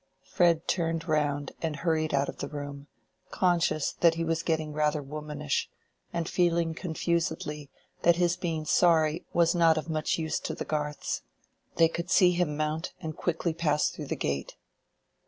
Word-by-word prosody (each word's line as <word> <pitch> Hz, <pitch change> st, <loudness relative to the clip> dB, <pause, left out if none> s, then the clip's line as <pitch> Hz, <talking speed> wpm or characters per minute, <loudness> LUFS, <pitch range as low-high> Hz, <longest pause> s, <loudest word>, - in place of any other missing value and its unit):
Fred 170 Hz, -3 st, +2 dB
turned 165 Hz, -1 st, -1 dB
round 145 Hz, -3 st, 0 dB
and 160 Hz, -2 st, -1 dB
hurried 160 Hz, -1 st, 0 dB
out 140 Hz, -1 st, +2 dB
of -, -, -6 dB
the -, -, -3 dB
room, 145 Hz, -1 st, -7 dB, 0.4 s
conscious 170 Hz, -4 st, +1 dB
that 170 Hz, -1 st, +5 dB
he 165 Hz, -, -1 dB
was 165 Hz, 0 st, 0 dB
getting 155 Hz, -2 st, -1 dB
rather 150 Hz, 0 st, +1 dB
womanish, 150 Hz, 0 st, -3 dB, 0.4 s
and 170 Hz, -1 st, -2 dB
feeling 170 Hz, -2 st, +1 dB
confusedly 160 Hz, -3 st, -2 dB, 0.3 s
that 170 Hz, 0 st, +5 dB
his 175 Hz, 0 st, +2 dB
being 165 Hz, -4 st, -3 dB
sorry 160 Hz, -1 st, +3 dB
was 170 Hz, -1 st, +3 dB
not 165 Hz, -2 st, +4 dB
of 155 Hz, +1 st, -3 dB
much 155 Hz, -1 st, 0 dB
use 160 Hz, -1 st, -1 dB
to -, -, -4 dB
the -, -, -5 dB
Garths. 150 Hz, -1 st, -2 dB, 0.5 s
They 165 Hz, -, +6 dB
could 170 Hz, +2 st, -5 dB
see 185 Hz, -1 st, +6 dB
him 175 Hz, -4 st, 0 dB
mount, 155 Hz, +2 st, -2 dB
and 160 Hz, -3 st, -5 dB
quickly 170 Hz, -1 st, -1 dB
pass 150 Hz, -3 st, +1 dB
through -, -, -7 dB
the -, -, -2 dB
gate. 70 Hz, -1 st, -3 dB
160 Hz, 165 wpm, -28 LUFS, 150-170 Hz, 0.5 s, They